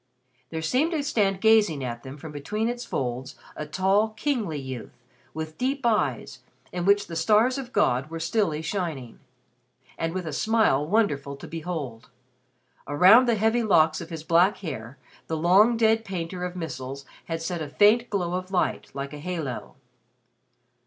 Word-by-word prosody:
There 160 -1 -4
seemed 275 - +1
to 305 -3 0
stand 200 -9 +1
gazing 210 -10 +4
at 120 -2 -4
them 135 +3 -9
from 155 +1 -9
between 210 +11 -2
its 240 0 -4
folds 125 +1 -4 0.2
a 150 - -5
tall 195 +7 +2
kingly 215 - -2
youth 130 -3 -8 0.3
with 155 0 -7
deep 270 +1 -1
eyes 225 -3 0 0.3
in 175 -1 -3
which 200 +1 +4
the 165 - -8
stars 215 +10 +3
of 255 -2 -7
God 135 - +1
were 165 0 -5
stilly 165 -2 0
shining, 155 - -4 0.8
and 165 - -1
with 185 -2 -3
a 155 - -4
smile 220 -7 +2
wonderful 150 -7 0
to - - -10
behold. 155 -8 -6 0.8
Around 190 - +6
the 235 - +3
heavy 225 +3 +2
locks 160 -7 +3
of - - -8
his 165 -2 -6
black 170 +5 +3
hair 135 - -7 0.3
the 160 - -2
long 195 +8 +5
dead 225 0 +3
painter 180 -2 -5
of 180 0 -6
missals 140 -5 -6 0.2
had 165 -1 -3
set 175 -1 -3
a 150 - -4
faint 215 +8 +4
glow 180 -4 -1
of 185 0 -3
light 185 -2 -1
like 140 +1 -5
a 150 - -7
halo. 160 -6 -5
175 Hz, 165 wpm, -26 LUFS, 150-215 Hz, 0.8 s, Around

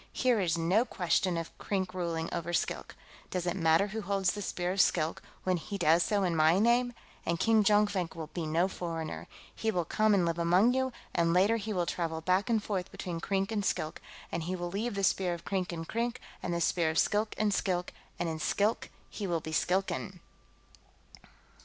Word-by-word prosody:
"Here 250 -4 +2
is 170 -3 +1
no 180 +7 +3
question 180 -5 0
of 165 -1 -5
Krink 190 -2 -2
ruling 170 -3 -2
over 170 +1 -3
Skilk. - - -2 0.3
Does 180 -1 -2
it 175 0 0
matter 165 +3 +3
who 220 +2 -4
holds 195 -2 +1
the 205 - -5
Spear 180 -2 -2
of 195 +1 +3
Skilk, 160 -2 +1 0.2
when 185 -1 +1
he 200 +5 -5
does 165 -1 +4
so 205 +2 +1
in 175 -3 +1
my 160 +2 +5
name? 240 +3 +3 0.3
And 170 -1 -1
King 220 +2 +4
Jonkvank 205 -5 +2
will 160 -2 -7
be 165 -3 -3
no 165 +4 +2
foreigner. 165 -4 -5 0.3
He 225 - -2
will 180 -5 0
come 215 +4 +3
and 180 -3 +3
live 170 0 -1
among 180 +8 +4
you, 260 0 0 0.2
and 170 -1 +2
later 200 +6 +4
he 220 0 -4
will 180 -4 0
travel 165 -2 -2
back 185 +6 +1
and 220 -3 +2
forth 190 -4 -2
between 170 -2 -5
Krink 195 +3 -1
and 210 -2 -1
Skilk, 155 -5 -2 0.3
and 170 - -2
he 180 +3 -2
will 175 -1 -4
leave 215 +3 -2
the 200 - -2
Spear 180 -2 +2
of 170 - -12
Krink 190 -2 -1
in 165 -1 -5
Krink, 235 +5 -2 0.2
and 175 - -3
the 170 0 -1
Spear 165 0 +2
of 160 - -2
Skilk 215 +1 +1
in 215 -1 +2
Skilk, 180 -2 -1 0.2
and 175 - -1
in 160 -1 -3
Skilk 205 +7 0 0.2
he 205 - -5
will 170 -2 0
be 160 - -7
a - - -6
Skilkan." 185 +2 0
185 Hz, 210 wpm, -31 LUFS, 170-205 Hz, 0.3 s, my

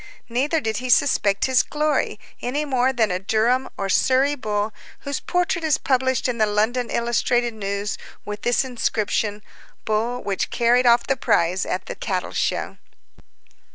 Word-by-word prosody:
Neither 280 +7 +1
did 220 -6 -2
he 255 +1 -4
suspect 210 -6 +3
his 260 -2 +4
glory, 300 0 -1 0.2
any 285 +5 -1
more 260 -2 +2
than 225 -6 +1
a 180 - -1
Durham 225 +6 +1
or 195 - -2
Surrey 265 +8 +3
bull 210 -5 -2 0.3
whose 280 -1 -3
portrait 355 -1 -1
is 310 -2 +2
published 260 -1 +1
in 240 -2 -2
the 215 - +4
London 225 +4 0
Illustrated 240 0 +1
News, 200 -1 -3 0.3
with 210 0 -6
this 245 +2 +1
inscription: 215 -4 -1 0.4
"Bull 230 +3 -1
which 195 -1 -2
carried 245 +1 +3
off 235 0 +5
the 270 - +1
prize 175 +2 +1
at 185 - -3
the - - -5
Cattle 185 -4 -3
Show." - - -1
240 Hz, 155 wpm, -22 LUFS, 210-260 Hz, 0.4 s, off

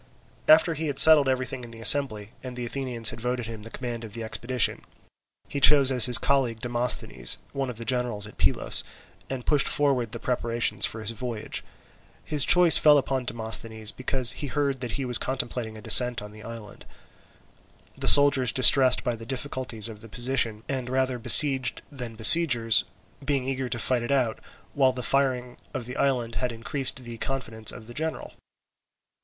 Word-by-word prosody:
After 160 +2 +4
he 160 +1 -5
had 140 -2 -5
settled 150 -3 +6
everything 130 -1 -4
in 120 - -10
the 115 0 -13
assembly, 115 -4 +1
and 130 -1 -9
the 125 -1 -6
Athenians 120 -3 0
had 115 - -11
voted 125 0 -4
him 110 -1 -9
the 115 - -12
command 120 -1 -7
of 110 -2 -10
the 115 - -6
expedition, 115 +2 -1 0.6
he 140 - -6
chose 140 -1 +5
as 125 -1 +5
his 125 -1 +3
colleague 130 -5 -1
Demosthenes, 120 - -1 0.2
one 135 -1 -4
of 120 - -9
the 115 - -9
generals 120 -4 -3
at 105 - -14
Pylos, - - +1 0.5
and 130 -2 -7
pushed 145 -2 +2
forward 135 -6 0
the - - -7
preparations 115 -4 -2
for 110 - -9
his 110 - -5
voyage. 115 -1 -7 0.6
His 150 -3 +1
choice 175 -2 +5
fell 150 -1 +4
upon 135 -2 -3
Demosthenes 110 -1 -1
because 130 -2 +1
he 145 - -5
heard 140 0 -3
that 125 -3 -6
he 135 - -4
was 125 -2 +2
contemplating 120 -4 -5
a - - -12
descent 125 -1 +5
on 105 - -11
the 110 0 -15
island; 115 -2 -12 1.1
the - - -6
soldiers 140 -4 +6
distressed 130 +2 +4
by 120 - -2
the 115 0 -10
difficulties 130 -4 -3
of 110 -2 -11
the 115 - -13
position, 120 -2 -2
and 130 -3 -5
rather 130 -1 -2
besieged 130 -1 +4
than 125 -5 -8
besiegers, 115 -2 +4 0.4
being 140 -2 -2
eager 135 -1 -4
to 120 - -2
fight 120 +1 0
it 120 - -6
out, 125 -5 -1 0.3
while 135 -2 +1
the 125 -1 -7
firing 130 -3 -2 0.2
of 120 - -5
the 125 - -9
island 125 -4 -2
had 125 -1 -2
increased 130 +3 -1
the 120 -1 -11
confidence 110 -5 -3
of 120 - -13
the 120 - -13
general. 160 +4 -6
125 Hz, 185 wpm, -24 LUFS, 115-135 Hz, 1.1 s, settled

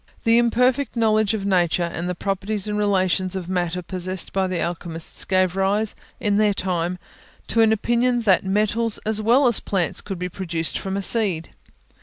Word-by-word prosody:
The 230 0 +4
imperfect 250 +4 +1
knowledge 220 -2 +2
of 200 -2 -4
Nature 180 -3 +2
and 170 +1 -3
the 180 - -2
properties 195 +2 -2
and 210 - -2
relations 190 -2 +1
of 185 -2 -4
matter 180 -1 -2
possessed 185 0 -3
by 190 -1 +1
the 185 -2 -2
alchemists 170 -1 -4
gave 185 -1 +1
rise, 200 +3 0 0.3
in 205 -1 +1
their 210 -1 +3
time, 180 -1 -1 0.5
to 230 - +2
an 220 -1 +5
opinion 240 +2 +1
that 195 -4 +3
metals 210 +3 0
as 215 0 -1
well 240 +6 +4
as 235 -4 +4
plants 180 -5 -2
could 195 -2 -6
be 180 +1 -3
produced 170 -3 -2
from 195 0 -3
a 200 - -2
seed. 190 -8 +2
195 Hz, 180 wpm, -22 LUFS, 180-220 Hz, 0.5 s, an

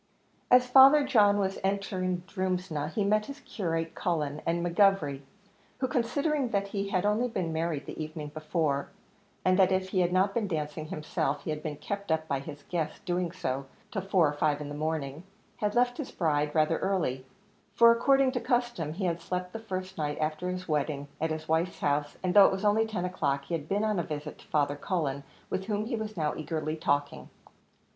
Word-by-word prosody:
As 250 0 +6
Father 270 +3 +8
John 205 -5 +5
was 195 -1 -1
entering 185 -2 -1
Drumsna, 185 -6 -2
he 210 - 0
met 210 +1 +2
his 280 +1 -8
curate, 165 -4 -3
Cullen, 155 -4 -2
and 170 +1 0
McGovery, 175 -6 +3 0.6
who, 260 - 0
considering 265 +3 0
that 200 -2 -1
he 200 -1 -2
had 185 0 0
only 215 +4 +2
been 185 -8 -2
married 160 -2 -2
the - - -5
evening 155 -1 -6
before, 155 -2 -1 0.6
and 185 +1 +4
that 190 -1 +5
if 185 0 0
he 190 - 0
had 175 -1 +2
not 190 +2 +2
been 225 -2 0
dancing 155 -2 -3
himself, 155 -1 -2
he - - -3
had 150 0 -4
been 155 -2 -4
kept 200 0 -4
up 160 0 0
by 140 -3 0
his 145 +1 -9
guests' 160 -3 -3
doing 175 -2 -1
so 135 -7 -3 0.2
till 195 - -2
four 185 -4 +3
or 145 - -1
five 145 0 +1
in 150 -1 -6
the - - -5
morning, 150 -1 -3 0.4
had 210 +1 -1
left 245 +2 +2
his 290 - -4
bride 150 -3 0
rather 155 +1 +3
early; 155 -10 -1 0.5
for, 235 0 +8
according 270 +3 +4
to 250 - -1
custom, 240 - -1
he 190 +3 -3
had 170 -1 -1
slept 180 +1 -4
the 225 - -4
first 185 -4 -5
night 150 -1 -1
after 155 +3 -1
his 185 0 -4
wedding 145 -2 -1
at 160 - +1
his 155 0 -4
wife's 165 +3 0
house, 145 0 0
and, 180 -1 +1
though 200 -2 +9
it - - +1
was 190 +2 -3
only 220 +2 +3
ten 195 -5 -2
o'clock, 140 -7 -1
he 155 - -6
had 155 -2 -3
been 205 +2 +1
on 215 -3 +1
a - - 0
visit 150 -1 -6
to - - -17
Father 145 -1 +1
Cullen, 145 -4 -2 0.3
with 190 - -2
whom 210 0 -1
he 235 +1 -2
was 215 -2 -5
now 150 -2 0
eagerly 155 0 -3
talking. 145 -2 -1
180 Hz, 205 wpm, -29 LUFS, 155-205 Hz, 0.6 s, though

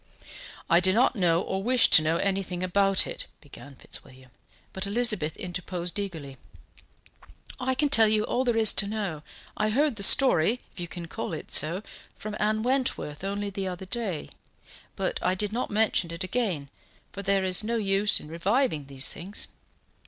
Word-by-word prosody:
"I 170 - +5
do 185 +1 +4
not 245 +4 +3
know, 175 -4 +2
or 190 0 -3
wish 245 +3 +4
to - - +8
know, 160 +2 0
anything 190 -2 -2
about 195 +1 +3
it," - - -5
began 145 -1 -13
Fitzwilliam, 130 -1 -10 0.4
but 190 +1 -2
Elizabeth 210 -8 0
interposed 180 0 -4
eagerly: 160 -9 -6 1.2
"I 260 0 -1
can 290 +3 +2
tell 225 -6 +5
you 215 0 +2
all 250 - -1
there 240 -3 0
is 220 -2 +5
to 200 - +4
know. 200 -8 -3 0.3
I 215 - 0
heard 275 +2 +1
the - - -4
story, 230 0 +5
if - - -12
you 175 - -4
can 170 0 -7
call 165 - -5
it 155 - -7
so, 170 +6 +2 0.3
from 215 0 -7
Anne 215 +1 0
Wentworth 245 - -1
only 200 +1 -3
the 195 0 -4
other 185 +1 -6
day: 190 -6 -4 0.7
but - - -2
I 180 +1 +1
did 210 +2 -1
not 245 - -2
mention 205 -5 +1
it 170 +3 -4
again, 185 - -2 0.4
for 200 - -7
there 195 0 +1
is 185 +2 +2
no 230 +2 -2
use 205 -1 +2
in - - -11
reviving 170 - 0
these 135 -1 0
things. 190 +5 -4
195 Hz, 175 wpm, -26 LUFS, 170-215 Hz, 1.2 s, to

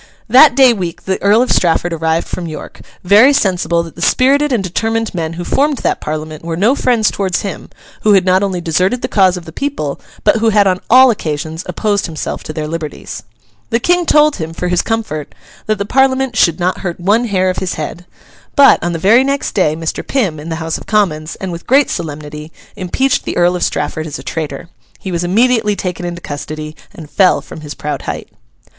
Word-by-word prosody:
That 255 +4 +7
day 260 -3 +6
week 180 -6 -5
the 190 0 -2
Earl 210 +4 +4
of 255 - -2
Strafford 175 0 +1
arrived 160 0 -1
from 175 -2 -5
York, 155 - -9 0.2
very 210 +9 +6
sensible 180 -7 +1
that 165 - -11
the 170 - -10
spirited 280 +9 +3
and 230 -6 +1
determined 225 +5 -2
men 165 -2 -3
who 175 +1 -5
formed 285 +8 +1
that - - 0
Parliament 155 0 -5
were 165 0 -4
no 215 +8 +3
friends 240 -6 +1
towards 190 -3 -1
him, 195 - -6 0.3
who 215 - +4
had 190 -2 +4
not 185 +1 +3
only 190 -3 -1
deserted 180 +9 0
the - - 0
cause 190 -3 +3
of 175 - -9
the 160 - -9
people, 260 - -3 0.2
but - - +4
who 225 0 +2
had 205 -1 +4
on 185 -1 +1
all 255 +1 +7
occasions 160 -4 -4
opposed 205 -3 -1
himself 160 -3 -5
to - - -7
their 155 0 -4
liberties. 155 -2 -6 0.5
The 230 - +1
King 355 +5 +1
told 300 0 +4
him, 160 0 -5
for 180 +2 -3
his 180 -1 +2
comfort, 215 -10 -4 0.3
that 215 0 +1
the 200 - -3
Parliament 265 +1 +1
'should 170 -5 +3
not 180 +1 0
hurt 175 -3 -5
one 205 +7 +2
hair 185 -4 +1
of 185 - -7
his 190 -1 -3
head.' 170 +3 -6 0.5
But, 280 -2 +6
on 175 0 -1
the - - -2
very 215 +9 +4
next 275 +1 -1
day 155 -7 +1
Mr. 165 0 -3
Pym, 195 - -1
in 155 +3 -8
the 165 - -2
House 160 0 -3
of - - -13
Commons, 170 -7 0
and 190 -2 -5
with 170 0 -8
great 275 +2 +3
solemnity, 150 -1 -6 0.2
impeached 215 +8 0
the - - -4
Earl 175 +1 +3
of 180 - -4
Strafford 155 0 -2
as 150 - -5
a - - -10
traitor. 155 0 -5 0.3
He 190 - -6
was 170 0 -1
immediately 220 +3 +2
taken 180 -2 -4
into 175 0 -6
custody 155 +1 -6 0.2
and 170 -7 -11
fell 180 +6 +3
from 160 - -11
his 150 -1 -8
proud 150 0 -4
height. - - -6
185 Hz, 215 wpm, -15 LUFS, 165-225 Hz, 0.5 s, That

